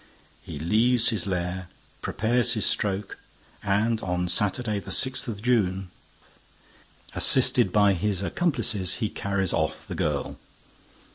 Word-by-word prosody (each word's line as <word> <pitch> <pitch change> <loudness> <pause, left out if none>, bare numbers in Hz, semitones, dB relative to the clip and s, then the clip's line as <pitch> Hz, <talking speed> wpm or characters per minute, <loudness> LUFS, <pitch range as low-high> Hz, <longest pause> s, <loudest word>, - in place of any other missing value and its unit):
He - - -9
leaves 115 - +3
his 105 -5 -2
lair, 90 0 -3 0.3
prepares 120 +2 +1
his 110 - -1
stroke 100 -1 -2 0.4
and, 105 +3 0
on 90 -1 -2
Saturday 105 +2 0
the - - -11
sixth 130 0 +2
of 105 -3 -6
June, 95 -7 0 1.2
assisted 95 - +4
by 100 -1 +4
his 95 +1 -2
accomplices, 105 - 0
he 110 -3 -2
carries 100 -2 -1
off 80 -1 -2
the - - -6
girl. 75 -2 -3
100 Hz, 125 wpm, -25 LUFS, 90-115 Hz, 1.2 s, assisted